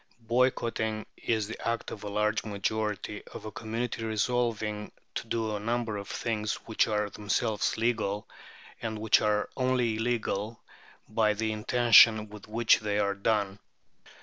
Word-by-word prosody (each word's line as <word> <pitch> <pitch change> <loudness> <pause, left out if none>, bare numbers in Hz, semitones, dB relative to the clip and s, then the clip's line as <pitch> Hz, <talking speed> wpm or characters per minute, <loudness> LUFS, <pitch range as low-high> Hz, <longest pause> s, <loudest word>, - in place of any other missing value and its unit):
Boycotting 115 -3 +1
is 110 -3 -1
the 110 - -7
act 115 0 -2
of 105 - -7
a 105 - -4
large 105 +1 +1
majority 105 0 -2
of - - -7
a 110 - -5
community 115 +1 -3
resolving 110 -1 -1 0.2
to - - -4
do 110 -2 -1
a - - -3
number 115 0 -1
of 100 - -6
things 110 -2 -2
which 110 - +2
are 105 -1 0
themselves 105 +2 0
legal, 110 -2 0 0.5
and 110 -1 -3
which 110 0 +4
are 105 -1 +1
only 125 -3 +1
illegal 110 -2 -1 0.5
by 110 -1 +2
the 110 +1 -1
intention 110 -1 +6
with 105 -1 -11
which 115 +1 +4
they 105 -1 -1
are 100 -1 +2
done." 100 -1 0
110 Hz, 150 wpm, -29 LUFS, 105-115 Hz, 0.5 s, intention